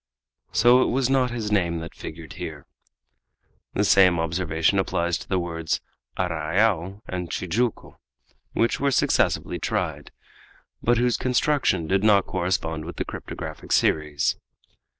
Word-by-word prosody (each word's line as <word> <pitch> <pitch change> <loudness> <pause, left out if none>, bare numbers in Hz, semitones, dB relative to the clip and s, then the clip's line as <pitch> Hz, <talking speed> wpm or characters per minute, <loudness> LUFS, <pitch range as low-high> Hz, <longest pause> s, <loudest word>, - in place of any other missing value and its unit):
So 120 +2 +5
it - - +3
was 130 +1 +1
not 130 -2 +3
his 115 -3 -4
name 85 -5 +1
that 85 - -8
figured 80 -1 -9
here. - - -7 1.1
The 100 - +2
same 95 -3 +5
observation 80 +2 +1
applies 85 -2 0
to - - -11
the 95 - +1
words 85 -2 -2 0.4
arrayal 95 +2 0
and 90 -2 -4
Tijuco, 110 +7 -2 0.6
which 115 - +1
were 140 - +2
successively 135 - +1
tried, - - -2 0.7
but 120 +1 +3
whose 120 0 +2
construction 130 - +1
did 95 +4 +1
not 105 -3 +5
correspond 85 -3 -2
with 85 +2 -7
the - - -3
cryptographic - - -7
series. 75 -2 +1
95 Hz, 130 wpm, -24 LUFS, 85-115 Hz, 1.1 s, So